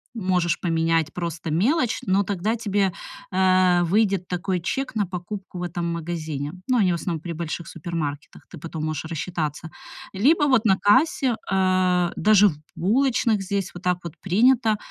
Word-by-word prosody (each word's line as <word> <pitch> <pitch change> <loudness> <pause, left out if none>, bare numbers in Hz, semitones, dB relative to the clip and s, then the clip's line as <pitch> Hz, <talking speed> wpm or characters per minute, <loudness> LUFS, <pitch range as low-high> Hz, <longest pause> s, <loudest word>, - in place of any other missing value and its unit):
можешь 185 -5 0
поменять 165 -2 0
просто 170 -2 -4
мелочь, 240 - +1
но 195 +1 +2
тогда 200 +3 -1
тебе, 205 -4 0 0.4
а, 185 -1 +3
выйдет 195 0 +1
такой 180 +1 -2
чек 260 +9 -3
на 210 -2 +1
покупку 185 +1 -7
в - - -4
этом 175 0 -3
магазине. 160 -3 -4
Ну, 255 - +2
они 195 -5 +3
в - - +1
основном 170 -2 -3
при 170 0 -5
больших 165 +1 -5
супермаркетах, 155 -3 -5
ты 175 - -10
потом 160 0 -5
можешь 155 0 -3
рассчитаться. 160 -1 -4 0.4
Либо 290 - +3
вот 255 -5 +3
на 190 -3 +4
кассе, 255 +4 +3 0.2
э, 185 -2 +2
даже 210 -1 +5
в 155 - -6 0.2
булочных 230 +1 +1
здесь 195 -1 -2
вот 175 - -9
так 180 -1 +1
вот 170 -2 -7
принято, 220 +3 +3
180 Hz, 160 wpm, -23 LUFS, 170-205 Hz, 0.4 s, даже